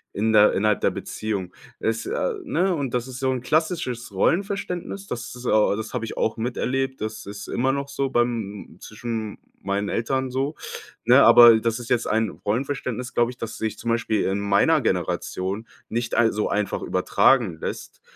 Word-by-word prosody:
in 110 +2 +1
der 105 -1 +6
innerhalb 105 0 +2
der - - +2
Beziehung. 100 -5 -4 0.2
Es, 115 0 -1
äh - - -1
ne, 190 - +1
und 135 -5 -3
das 125 0 -1
ist 130 -1 -8
so 130 -1 +1
'n 130 - -2
klassisches 130 - -1
Rollenverständnis. 195 - -1
Das, 120 - -5
äh 105 -4 +3
das 110 +3 -6
habe 120 -2 -2
ich - - -7
auch 110 - 0
miterlebt. 130 +3 -2
Das 110 0 -5
ist 100 0 -8
immer 130 +2 +1
noch 140 0 -3
so 140 -1 -1
bei 120 - +3
m 110 -4 -3
m - - -21
zwischen 115 +3 -9 0.2
m - - -16 0.3
meinen 100 +1 -1
Eltern 130 +3 -1
so, 135 +4 -2 0.5
ne? - - +7
Aber 120 -2 +9
das 115 +1 -1
ist 120 - -8
jetzt 120 -1 +2
ein 110 0 +1
Rollenverständnis, 125 +3 -3
glaube 120 0 +2
ich, 125 - -14
das 115 -2 -6
sich 110 -1 -3
zum 115 - -4
Beispiel 115 -2 0
in 95 +1 0
meiner 100 0 +3
Generation 100 +5 -2 0.2
nicht 120 +1 -2
ei 120 - +4
äh, - - 0
so 105 0 -1
einfach 105 -1 -1
übertragen 115 -12 +2
lässt. - - -6
120 Hz, 190 wpm, -24 LUFS, 110-130 Hz, 0.5 s, Aber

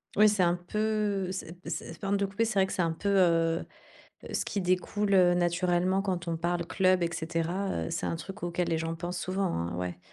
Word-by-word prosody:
Oui, 215 +1 +7
c'est 210 -2 +2
un 175 -1 +4
peu 205 +1 -1
c'est 180 -3 -6
c'est 165 0 -5
pardon 200 +1 0
de 200 - +1
te - - -6
couper, 215 +4 +1
c'est 220 -2 -1
vrai 190 - +5
que - - -5
c'est 195 - 0
un 165 -1 +1
peu, 200 +5 -2
heu 165 -4 +3 0.6
heu, - - -9
ce - - 0
qui 200 - -2
découle, 185 +3 0
heu, 180 -2 +6
naturellement 180 +2 +1
quand 180 -3 -2
on 165 - 0
parle 170 +1 -1
club 185 0 +3
et 170 - +1
cetera, 165 - -2
heu, - - -5
c'est - - -2
un - - -1
truc 190 +3 -7
auquel 175 0 -1
les 165 - +1
gens 165 0 -2
pensent 175 +2 -4
souvent, 190 +2 -1
hein, 85 +1 -2
ouais. 90 0 -4
180 Hz, 235 wpm, -29 LUFS, 170-195 Hz, 0.6 s, Oui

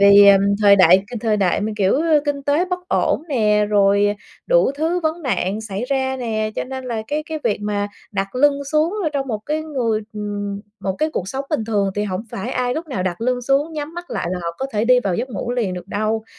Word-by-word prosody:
vì, 200 0 +8
ờm, 195 -1 +7 0.2
thời 200 -1 +7
đại 185 +1 +6
cái 245 - -7
thời 220 -2 +1
đại 190 -4 +1
mà, 215 +2 -2
kiểu, 200 +7 +2 0.2
kinh 285 -2 -2
tế 290 +5 +2
bất 360 0 -5
ổn - - +1
nè, 210 -5 +2
rồi 205 0 +3 0.3
đủ - - +4
thứ 325 +5 0
vấn 325 +1 -2
nạn 215 - -1
xảy 220 +1 -4
ra 265 0 -1
nè, 220 -3 -2
cho - - -1
nên 260 0 -6
là 230 -3 -3
cái 300 +1 -1
cái 315 -1 -4
việc 205 - 0
mà 205 0 -2 0.2
đặt 195 +3 -3
lưng 280 +1 +2
xuống 310 +5 +2
rồi 315 - 0
trong 275 -2 -2
một 220 - -2
cái 310 +1 -1
người 245 -8 -1
ừm, 205 -1 -4 0.2
một 190 -1 -1
cái 310 +1 +1
cuộc 190 - -3
sống 270 +3 -4
bình 295 -8 0
thường 205 -3 0
thì 205 0 -1
hổng 185 0 -3
phải 210 +6 -4
ai 250 -1 -1
lúc 325 +2 -4
nào 255 -11 -3
đặt 180 +1 -3
lưng 250 +1 0
xuống, 275 +5 +1
nhắm 305 +1 -5
mắt 345 0 -8
lại - - -2
là 185 - -2
họ 170 - -2
có 270 - -2
thể 215 +1 +1
đi 250 +1 +5
vào 195 -6 -1
giấc 240 +8 -2
ngủ 235 +2 -4
liền 230 -7 -1
được 180 +1 -8
đâu. 215 +2 -1
225 Hz, 245 wpm, -20 LUFS, 205-280 Hz, 0.3 s, vì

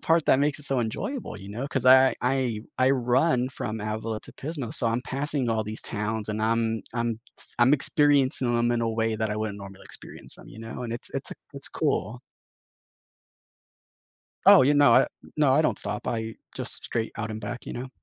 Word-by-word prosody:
part 165 -1 +2
that 130 - +5
makes 145 0 +1
it 145 - -6
so 135 -2 0
enjoyable, 120 - -3
you 100 0 -10
know, 115 +7 -4
'cause 130 -3 -2
I 130 +1 +7
I 125 -4 0 0.2
I 130 +1 +3
run 130 +1 +2
from 110 -4 -5
Avila 110 +1 -3
to - - -12
Pismo, 140 -5 -5
so - - +2
I'm 115 +2 +1
passing 135 0 -2
all 110 -2 0
these 110 +1 -3
towns, 105 0 -3
and 110 0 -2
I'm 115 0 +1
I'm 115 -2 -1 0.2
s - - -4
I'm 120 +3 +5
experiencing 140 -4 +2
'em 120 0 +2
in 120 -1 0
a 115 - +1
way 110 0 0
that 110 -1 -1
I 105 - -2
wouldn't 110 -1 -3
normally 100 -1 -11
experience - - -9
'em, - - -14
you - - -12
know? 115 +2 -7
And 115 -1 -4
it's 120 - -5
it's - - -2
a - - -6 0.2
it's - - -8
cool. 110 +6 -1 2.3
Oh, 200 -4 +9
yeah, 140 +3 +4
no, 145 -5 +6
I 130 - +6 0.3
no, 150 -3 +4
I 155 - +4
don't - - 0
stop, 105 0 -4
I 115 -2 -3 0.2
just - - +2
straight 115 -1 -2
out 110 -1 -4
and 110 0 -5
back, 120 +4 -6
you - - -6
know? 125 +2 -5
120 Hz, 210 wpm, -26 LUFS, 110-135 Hz, 2.3 s, Oh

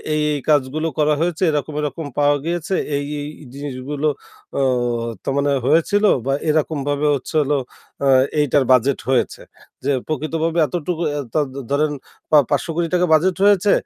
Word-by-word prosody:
এই 155 - +1
এই 145 - -2
কাজগুলো 150 +2 +2
করা 150 0 +3
হয়েছে 175 +1 -1
এরকম, 150 +1 -2
এরকম 150 +2 -4
পাওয়া 145 0 +4
গিয়েছে। 175 +2 -2 0.2
এই, 140 - -1 0.2
এই 145 - -5 0.3
জিনিস 140 0 -6
যেগুলো 145 +3 -2 0.5
অ - - +2 0.6
ত - - -30
মানে 140 0 +1 0.2
হয়েছিল 165 +8 +3 0.2
বা 135 - +1 0.2
এরকমভাবে 145 -1 0
হচ্ছে 140 +4 -7
হলো 145 0 +1 0.5
আ - - +3 0.3
এইটার 145 -1 +3
বাজেট 130 +2 +3
হয়েছে। 130 - 0 0.4
যে 140 - +1 0.2
প্রকৃতভাবে 160 +2 -1
এতটুকু 170 +3 -3
অ্যা 145 0 -2
ত - - -20 0.4
ধরেন 150 +1 +2 0.4
বা 155 - +7
পা 125 - -8
৳৫,০০,০০,০০,০০০ 175 +2 0
বাজেট 175 +3 +3
হয়েছে 205 0 +4
150 Hz, 155 wpm, -20 LUFS, 145-165 Hz, 0.6 s, বা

